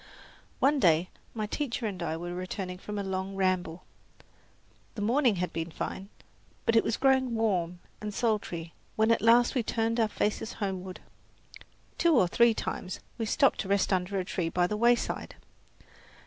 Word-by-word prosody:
One 280 +2 +3
day 170 -3 +3 0.3
my 215 -1 -1
teacher 240 +1 -3
and 195 -4 -4
I 160 -1 -2
were 175 +1 -5
returning 180 0 -5
from 210 +2 -6
a 200 - -2
long 190 0 -3
ramble. 185 -3 0 1.1
The 210 - -5
morning 240 0 +3
had 180 0 -3
been 165 +1 -3
fine, 190 +4 -5 0.6
but 230 - +2
it 225 - +5
was 225 - -1
growing 260 -3 +3
warm 180 -6 0 0.2
and 210 0 -4
sultry 200 -7 -2 0.2
when 220 +1 +3
at 230 - +3
last 235 +2 +5
we 255 - +1
turned 230 +1 -1
our 225 - +4
faces 215 +1 -2
homeward. 190 -3 -4 1.0
Two 340 -3 +4
or 190 -8 +5
three 235 +4 +4
times 185 - -4 0.2
we 225 - -1
stopped 275 +5 +3
to - - -2
rest 200 0 +2
under 185 +2 0
a 185 - -1
tree 175 -2 -2
by 175 +1 +2
the 210 - -2
wayside. 235 +2 +1
205 Hz, 170 wpm, -29 LUFS, 180-230 Hz, 1.1 s, it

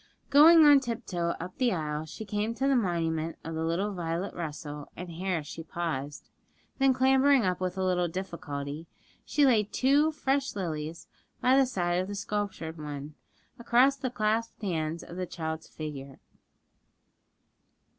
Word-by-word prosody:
Going 315 +3 +8
on 290 -1 +8
tip 240 -2 -5
toe 170 -2 -1
up 185 - -8
the 250 -2 +3
aisle, 155 -2 -3
she 220 - -8
came 210 +3 -2
to 270 +3 0
the 275 - +3
monument 165 -6 0
of 165 - -5
little 165 +6 -1
Violet 170 +1 -3
Russell, 150 -3 -6
and 180 0 -7
here 175 -1 -2
she 165 - -8
paused, 155 -4 -5 0.5
then 270 0 +5
clambering 265 -1 +4
up 180 -1 0
with 185 0 -2
a 190 - 0
little 180 -1 +1
difficulty, 165 -4 -5 0.4
she 290 - +2
laid 215 -6 +3
two 285 +4 +3
fresh 275 -3 -1
lilies 160 -4 -4 0.3
by 255 +1 +4
the 270 -1 +5
side 175 -6 0
of 185 - -4
the 205 - -5
sculptured 200 -6 -4
one, 145 0 -6 0.5
across 245 +4 +4
the 265 -1 -3
clasped 225 0 -1
hands 165 -3 -2
of 175 - -10
the 185 -1 -3
child's 160 -2 -5
figure. 140 -3 -8
180 Hz, 155 wpm, -29 LUFS, 160-240 Hz, 0.5 s, Going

